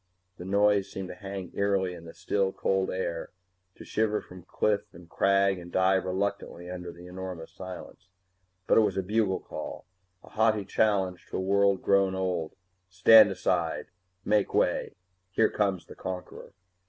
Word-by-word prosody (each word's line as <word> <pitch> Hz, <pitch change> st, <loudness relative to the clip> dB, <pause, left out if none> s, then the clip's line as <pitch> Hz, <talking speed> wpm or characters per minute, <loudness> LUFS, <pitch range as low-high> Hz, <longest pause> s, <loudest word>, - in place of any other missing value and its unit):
The 90 Hz, -, -8 dB
noise 100 Hz, 0 st, +2 dB
seemed 95 Hz, -1 st, -6 dB
to -, -, -6 dB
hang 95 Hz, -1 st, -7 dB
eerily 100 Hz, -2 st, 0 dB
in 85 Hz, -1 st, -11 dB
the 80 Hz, -, -11 dB
still, 95 Hz, +2 st, 0 dB
cold 95 Hz, 0 st, 0 dB
air; 85 Hz, -3 st, -3 dB, 0.5 s
to -, -, -12 dB
shiver 105 Hz, -1 st, 0 dB
from 90 Hz, 0 st, -12 dB
cliff 100 Hz, +3 st, 0 dB
and 85 Hz, 0 st, -13 dB
crag 100 Hz, +1 st, +2 dB
and 85 Hz, 0 st, -11 dB
die 95 Hz, +1 st, +3 dB
reluctantly 95 Hz, -2 st, -2 dB
under 90 Hz, -1 st, -6 dB
the 85 Hz, +1 st, -13 dB
enormous 90 Hz, -2 st, -7 dB
silence. 95 Hz, +1 st, -10 dB, 0.6 s
But -, -, +5 dB
it -, -, +6 dB
was 100 Hz, -3 st, 0 dB
a 95 Hz, -, 0 dB
bugle 105 Hz, -1 st, 0 dB
call, -, -, -7 dB, 0.4 s
a -, -, -15 dB
haughty 110 Hz, -2 st, +2 dB
challenge 95 Hz, -4 st, 0 dB
to -, -, -4 dB
a -, -, -1 dB
world 100 Hz, 0 st, +2 dB
grown 100 Hz, -1 st, +3 dB
old 90 Hz, -4 st, -2 dB, 0.3 s
stand 105 Hz, +4 st, +7 dB
aside, 90 Hz, -3 st, -1 dB, 0.4 s
make 105 Hz, -1 st, +1 dB
way, -, -, +1 dB, 0.3 s
here 110 Hz, +3 st, +2 dB
comes 95 Hz, -4 st, 0 dB
the -, -, -11 dB
conqueror! 90 Hz, 0 st, -7 dB
95 Hz, 165 wpm, -28 LUFS, 90-100 Hz, 0.6 s, stand